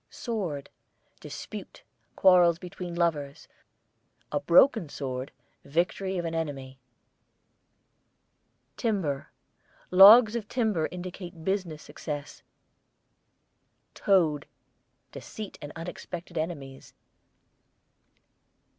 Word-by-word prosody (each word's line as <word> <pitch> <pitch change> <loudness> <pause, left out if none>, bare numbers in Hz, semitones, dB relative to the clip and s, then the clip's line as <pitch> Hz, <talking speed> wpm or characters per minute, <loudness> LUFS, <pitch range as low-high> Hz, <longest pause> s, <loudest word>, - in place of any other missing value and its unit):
SWORD, 185 - -4 0.5
dispute, - - -9 0.3
quarrels 180 -3 +5
between 180 -1 -7
lovers; 150 -5 -1 0.8
a 145 - 0
broken 170 - +4
sword, 130 -2 -5 0.3
victory 180 +5 -1
of 175 - -2
an 165 - -3
enemy. 135 -5 -4 2.0
TIMBER, 185 - -1 0.6
logs 210 +5 +9
of 220 -3 -3
timber 215 -10 0
indicate 180 -2 -8
business 185 -6 -2
success. 145 -2 -7 1.5
TOAD, 160 -7 +2 0.6
deceit 215 -2 -9
and 145 - -7
unexpected 170 +1 -8
enemies. 150 -5 -5
170 Hz, 75 wpm, -28 LUFS, 145-190 Hz, 2.0 s, logs